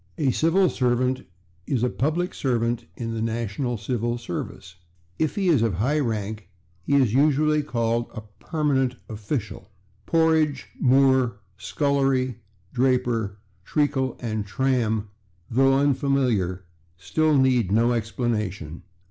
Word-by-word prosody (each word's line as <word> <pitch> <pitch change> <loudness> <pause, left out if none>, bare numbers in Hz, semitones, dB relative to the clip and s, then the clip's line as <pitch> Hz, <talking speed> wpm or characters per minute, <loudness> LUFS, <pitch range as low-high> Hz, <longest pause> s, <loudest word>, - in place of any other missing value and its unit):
A 145 -4 +1
/civil 165 +8 +3
servant/ 125 +1 0 0.4
is 125 -4 0
a 125 - +2
public 160 +6 -1
servant 120 -3 -1
in 115 -1 -4
the 115 - -3
national 115 +2 -2
civil 120 +3 -2
service; 90 -5 -7 0.4
if 155 -2 0
he 195 -2 0
is 155 -9 +4
of 115 -6 +1
high 130 - +1
rank, 110 -6 -3 0.3
he 115 +12 0
is 130 -6 +3
usually 150 +2 +3
called 115 -4 -1
a 110 - -6 0.2
/permanent 135 -5 0
official/. 110 0 -5 0.4
/Porridge/, 160 -3 +2 0.2
/moor/, 130 -2 +4 0.3
/scullery/, 135 +4 +1 0.4
/draper/, 125 -5 +1 0.3
/treacle/ 140 - 0
and 110 -3 -3
/tram/, 115 -2 0 0.5
though 135 +3 +4
unfamiliar, 130 - +1 0.3
still 155 - +1
need 125 -7 +3
no 115 +3 +3
explanation. 105 -8 -3
125 Hz, 120 wpm, -24 LUFS, 110-140 Hz, 0.5 s, is